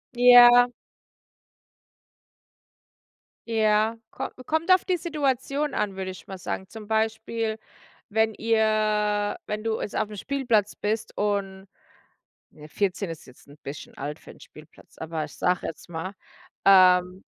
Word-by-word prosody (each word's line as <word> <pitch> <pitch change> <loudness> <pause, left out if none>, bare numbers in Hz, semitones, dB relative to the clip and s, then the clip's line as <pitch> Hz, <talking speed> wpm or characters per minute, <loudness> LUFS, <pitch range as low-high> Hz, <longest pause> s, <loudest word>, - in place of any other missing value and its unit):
Ja. 245 0 +8 2.8
Ja. 220 0 +2
Ko - - -5 0.2
kommt 320 +4 0
auf 370 - +5
die 370 - +1
Situation 295 -3 -2
an, 205 -2 -2
würde 190 -1 -4
ich 185 - -13
mal 190 -1 -7
sagen. 190 +2 -5
Zum 220 -2 -10
Beispiel, 220 0 -1 0.5
wenn 220 +1 +1
ihr 215 -2 +1
wenn 210 +1 -4
du 225 -1 -2
jetzt - - -4
aufm 215 -1 -2
Spielplatz 230 -3 0
bist 215 +1 -3
und 200 -2 -2 0.8
ne, 150 0 -14
14 195 +1 -2
ist 165 - -9
jetzt 125 - -18
'n 145 +1 -17
bisschen 140 +1 -9
alt 145 +2 -5
für - - -15
'n - - -15
Spielplatz, 155 +1 -17
aber 160 -1 -4
ich 150 - -11
sage 180 0 0
jetzt 165 - -8
mal 175 +4 -5 0.5
ähm 185 -1 +5
210 Hz, 135 wpm, -25 LUFS, 185-225 Hz, 2.8 s, Ja